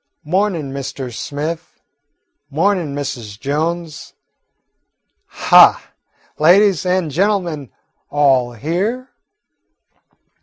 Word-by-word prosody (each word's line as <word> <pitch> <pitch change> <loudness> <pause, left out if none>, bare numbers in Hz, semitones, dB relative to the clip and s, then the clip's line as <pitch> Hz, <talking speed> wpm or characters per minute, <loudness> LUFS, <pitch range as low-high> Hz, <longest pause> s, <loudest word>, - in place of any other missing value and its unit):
"Mornin', 175 -3 -1
Mr. 135 -2 -6
Smith, 155 +7 -5 0.7
mornin', 165 -1 0
Mrs. 115 -7 -6
Jones. 155 +3 -3 1.1
Ha, - - +5 0.5
ladies 185 +2 +4
and 180 -4 0
gentlemen, 170 - -1 0.4
all 135 -4 +2
here?" 190 - -3
155 Hz, 70 wpm, -18 LUFS, 140-180 Hz, 1.1 s, Ha